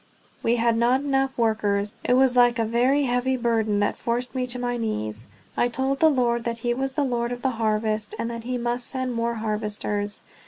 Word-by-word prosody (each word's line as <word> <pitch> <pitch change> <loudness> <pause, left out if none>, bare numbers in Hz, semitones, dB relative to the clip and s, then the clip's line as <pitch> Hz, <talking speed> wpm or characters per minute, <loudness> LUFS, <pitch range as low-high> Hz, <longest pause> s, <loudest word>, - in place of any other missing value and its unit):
We 230 - +2
had 230 -1 +2
not 245 +3 +3
enough 270 -1 0
workers. 210 -3 +1
It 245 - +2
was 255 0 +4
like 245 -1 +5
a 225 - +1
very 250 +6 +2
heavy 255 0 +1
burden 225 -4 +1
that 205 - +1
forced 240 +1 -2
me 255 -1 -1
to 250 0 -1
my 245 0 -2
knees. 110 - -3 0.3
I 240 - +2
told 265 +3 -1
the 320 - +6
Lord 240 -4 +1
that 230 0 -2
he 240 - +2
was 270 +2 -2
the 290 +1 0
Lord 240 -2 -1
of 245 0 -5
the 265 - +2
harvest, 215 - 0
and - - -2
that 230 -1 -6
he 250 +1 -2
must 240 0 -2
send 260 -2 -3
more 235 0 -1
harvesters. 210 -1 -2
240 Hz, 210 wpm, -24 LUFS, 225-255 Hz, 0.3 s, the